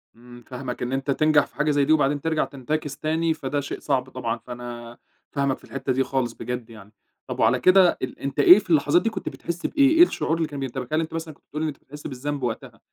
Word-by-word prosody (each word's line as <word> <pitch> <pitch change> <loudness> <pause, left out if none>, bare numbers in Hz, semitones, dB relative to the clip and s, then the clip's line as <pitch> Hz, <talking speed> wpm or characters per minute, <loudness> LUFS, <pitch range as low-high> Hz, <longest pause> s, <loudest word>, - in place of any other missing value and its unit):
امم، 120 +1 -14
فاهمك 125 -1 -6
إن 125 +1 -2
أنت 135 +1 -1
تنجح 155 0 +3
في - - -25
حاجة 150 0 +1
زي 145 -1 +2
دي 155 - +4
وبعدين 145 -1 +2
ترجع 160 0 0
تنتكِس 140 +1 -4
تاني، 160 +2 0
فده 145 -2 -3
شيء 140 - -6
صعب 130 -3 -1
طبعًا، 120 -3 -3
فأنا 120 0 -9 0.3
فاهمك 140 -2 0
في - - -26
الحتة 135 -1 -3
دي 135 +1 +2
خالص 130 -3 -1
بجد 120 0 -5
يعني. 105 -2 -13 0.4
طب - - -5
وعلى - - +3
كده 185 -1 +5
ال 130 - -5
أنت 140 +1 -4
إيه 180 +7 +9
في 200 - -13
اللحظات 155 +1 +4
دي 225 - 0
كنت 210 -4 -5
بتحس 170 +1 -6
بإيه؟ 280 -3 +4
إيه 325 +3 +7
الشعور 165 - 0
اللي 165 -1 0
كان 145 -2 -7
بينتابك؟ 130 0 -5
هل 155 - +3
أنتَ 160 - -5
مثلًا 165 -1 -5
كنت - - -29
بتقول 150 - -5
إن 160 - 0
أنت 145 -2 -5
بتحس 145 +2 -10
بالذنب 140 +1 -4
وقتها، 120 -3 -4
140 Hz, 240 wpm, -24 LUFS, 125-155 Hz, 0.4 s, إيه